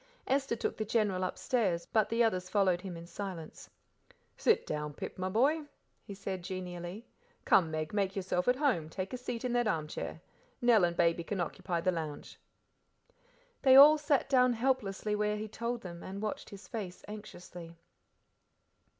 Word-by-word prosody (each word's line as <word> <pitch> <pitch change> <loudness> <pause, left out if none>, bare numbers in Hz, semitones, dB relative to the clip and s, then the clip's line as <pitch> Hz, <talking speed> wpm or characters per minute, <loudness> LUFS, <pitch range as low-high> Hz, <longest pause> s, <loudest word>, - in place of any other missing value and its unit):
Esther 270 -2 +1
took 230 - -3
the 220 - -1
General 205 -4 +1
upstairs, 185 -2 0
but 220 -3 +1
the 230 +1 +3
others 185 -5 0
followed 185 -4 +2
him 180 -3 -6
in 165 - -9
silence. 175 -2 -7 0.7
"Sit - - +2
down, 150 -1 -4
Pip, - - -7
my 185 0 -1
boy," 285 +10 +2 0.4
he 200 - -8
said 190 -2 -5
genially. 180 +2 -6 0.4
"Come, 170 -4 +5
Meg, 155 +1 -3
make 195 -2 0
yourself 185 -2 -1
at 250 - +5
home, 255 - +1
take 185 +6 -5
a - - -2
seat 245 -1 -5
in 245 - -1
that 240 -2 +2
armchair. 155 -7 -3 0.4
Nell 240 -5 +5
and 170 0 -2
Baby 170 0 +2
can 195 +3 -3
occupy 170 0 -2
the 185 - +2
lounge." 155 -4 -6 1.2
They 260 -1 +7
all 300 +3 +10
sat 295 -2 +1
down 250 -2 +4
helplessly 220 -4 0
where 210 0 0
he 215 +1 -4
told 235 +2 -3
them, 170 -2 -8
and 195 +1 -6
watched 215 0 -4
his 200 -1 -11
face 195 -6 -6
anxiously. 180 -5 -10
195 Hz, 165 wpm, -32 LUFS, 175-235 Hz, 1.2 s, all